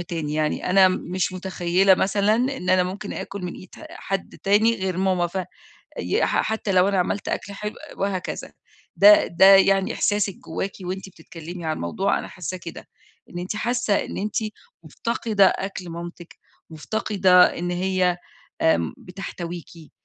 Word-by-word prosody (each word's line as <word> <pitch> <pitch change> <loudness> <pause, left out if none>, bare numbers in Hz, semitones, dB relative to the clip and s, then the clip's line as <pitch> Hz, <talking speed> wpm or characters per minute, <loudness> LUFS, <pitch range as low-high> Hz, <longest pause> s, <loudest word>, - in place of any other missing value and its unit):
تاني 165 -4 -4
يعني 155 +3 -1
أنا 190 0 +6
مش 185 0 -2
متخيلة 185 0 +2
مثلًا 200 +3 +2
إن 250 -5 -1
أنا 185 0 +4
ممكن 190 +3 -5
آكل 200 -1 -6
من 180 - -4
إيد 185 - -12 0.2
حد 195 -1 -5
تاني 215 +4 +3
غير 190 -2 -2
ماما 185 -2 +1
ف 185 +2 -4 0.6
ي - - 0
ح - - +1
حتى 220 -2 -2
لو 185 0 +4
أنا 200 -1 +1
عملت 195 +3 -2
أكل 200 - -3
حلو 210 +1 -5 0.2
وهكذا، 195 -2 -3 0.4
ده 310 0 +7
ده 170 +3 +4
يعني 195 0 +3
إحساسِك 205 -2 0
جواكِ 190 +4 -4
وأنتِ 185 +1 -5
بتتكلمي 170 0 -10
عن 155 0 -1
الموضوع 190 - -1
أنا - - -7
حاسّاه 180 0 -6
كده، 170 -1 -10 0.4
إن 175 - -6
أنتِ 180 +4 -4
حاسة 235 -1 0
إن - - -7
أنتِ 210 +1 -3 0.5
مفتقدة 220 -3 +1
أكل 190 -2 -3
مامتِك، 170 0 -9 0.3
مفتقدة 185 +2 +3
إن 175 +1 -2
هي 180 0 +1 0.4
آمم 85 - +2
بتحتويكي، 175 -3 -8
185 Hz, 155 wpm, -23 LUFS, 175-200 Hz, 0.6 s, ده